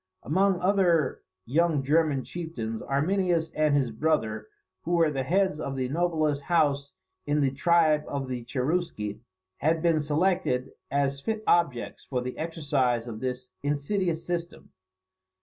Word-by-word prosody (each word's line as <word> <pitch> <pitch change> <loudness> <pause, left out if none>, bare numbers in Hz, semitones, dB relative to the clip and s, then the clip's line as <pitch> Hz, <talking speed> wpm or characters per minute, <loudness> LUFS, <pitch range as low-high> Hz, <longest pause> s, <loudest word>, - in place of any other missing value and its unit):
Among 190 - +2
other 180 -4 +2 0.2
young 155 +1 +2
German 150 -1 +2
chieftains, 120 -11 -5
Arminius 165 +3 +1
and 155 -1 +2
his 130 -4 +1
brother, 110 -5 0 0.3
who 175 - -2
were 165 -3 +4
the 135 -2 -1
heads 185 +3 +1
of 140 -3 -3
the 130 -1 -2
noblest 155 -2 0
house 145 -5 +1 0.3
in 150 0 +2
the 135 -2 +2
tribe 155 +1 +3
of 140 -2 -3
the 125 -2 -4
Cherusci, 125 - -2 0.4
had 160 +2 +1
been 165 -3 +3
selected 150 -4 0 0.2
as 140 -1 0
fit 220 +5 -2
objects 140 -9 +1
for 130 - -2
the 125 +1 -4
exercise 145 -7 0
of 115 -3 -6
this 125 0 -4
insidious 160 +4 -1
system. 175 -1 -4
150 Hz, 140 wpm, -27 LUFS, 135-170 Hz, 0.4 s, were